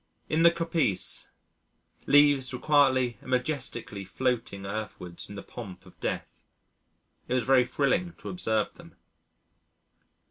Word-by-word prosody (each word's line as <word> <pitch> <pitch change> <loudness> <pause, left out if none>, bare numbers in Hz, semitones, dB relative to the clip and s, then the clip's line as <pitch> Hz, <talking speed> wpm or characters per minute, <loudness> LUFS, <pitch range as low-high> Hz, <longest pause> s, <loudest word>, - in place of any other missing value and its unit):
In 155 - +2
the 170 - +8
coppice, 165 - 0 0.8
leaves 145 -2 +5
were 125 - -4
quietly 130 -6 +3
and - - -12
majestically 125 -6 -2
floating 110 -2 -2
earthwards 100 -4 -6
in 100 - -8
the 100 - -7
pomp 100 -7 -9
of - - -18
death. - - -4 0.8
It 125 - 0
was 125 -3 +1
very 130 -2 +5
thrilling 165 +7 0
to - - -9
observe 110 - -1
them. - - -15
130 Hz, 130 wpm, -28 LUFS, 110-145 Hz, 0.8 s, the